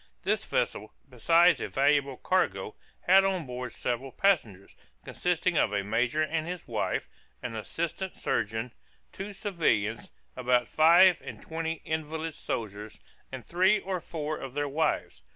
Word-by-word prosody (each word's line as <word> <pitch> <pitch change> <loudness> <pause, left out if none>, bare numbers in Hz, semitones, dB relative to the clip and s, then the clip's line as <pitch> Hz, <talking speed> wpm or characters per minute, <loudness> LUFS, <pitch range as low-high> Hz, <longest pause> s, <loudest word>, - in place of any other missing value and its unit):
This - - +1
vessel, 105 +1 -2
besides 165 +8 +4
a - - -2
valuable 140 -1 +2
cargo, 105 - 0 0.3
had 190 +2 +6
on 190 -4 0
board 125 0 -5
several 125 +2 -3
passengers, 120 - 0 0.3
consisting 180 -1 0
of - - +2
a 100 -1 0
major 120 +8 +1
and 160 +1 -2
his 180 -1 -6
wife, 110 -3 -2 0.4
an 125 -2 -4
assistant 170 - -4
surgeon, 110 +3 -2 0.4
two 195 +2 -6
civilians, 165 - -1 0.3
about 125 -1 +2
five 170 +3 +6
and - - -8
twenty 165 0 -4
invalid 160 0 -3
soldiers, 105 -5 -5 0.3
and 130 -2 -7
three 185 +4 +3
or 190 -1 -3
four 155 -2 -4
of 135 0 -8
their 145 0 0
wives. 155 +3 -1
150 Hz, 140 wpm, -28 LUFS, 120-175 Hz, 0.4 s, had